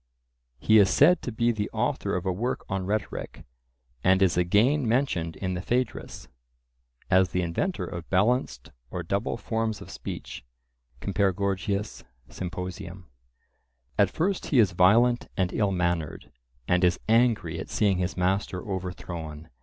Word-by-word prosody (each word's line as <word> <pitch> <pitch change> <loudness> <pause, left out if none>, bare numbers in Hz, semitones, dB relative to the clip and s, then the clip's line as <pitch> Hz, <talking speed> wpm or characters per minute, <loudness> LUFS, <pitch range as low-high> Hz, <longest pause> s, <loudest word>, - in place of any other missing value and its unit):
He 105 - +5
is 100 -2 +5
said 160 - +5
to 125 - -4
be 115 +2 +1
the 105 -2 -3
author - - -1
of 90 +1 -3
a 95 - +1
work 115 +8 -2
on 95 -1 -3
rhetoric, 105 0 -4 0.6
and 95 +1 +4
is 95 - +3
again 110 +11 +3
mentioned 105 -10 0
in 95 -1 -3
the 90 - -3
Phaedrus, 125 +4 -2 0.8
as 95 0 +5
the 90 0 -1
inventor 85 - -2
of 85 -1 -7
balanced 95 - +1 0.2
or 90 +3 -4
double 100 +5 -1
forms 110 -2 -2
of 100 - -10
speech - - -7 0.6
(compare 100 -1 +1
Gorg.; 100 0 -1
Symp.). 90 - -5 1.4
At 100 -2 +5
first 185 - -1
he 140 - +1
is 105 -6 +5
violent 115 +7 +4
and 90 -2 0
ill 105 -3 +1
mannered, 85 -4 -2 0.4
and 90 +1 +2
is 90 -1 +3
angry 115 0 +2
at - - -7
seeing 100 -3 +1
his 90 +1 -2
master 95 +1 -1
overthrown. 85 -5 -6
95 Hz, 145 wpm, -27 LUFS, 90-110 Hz, 1.4 s, He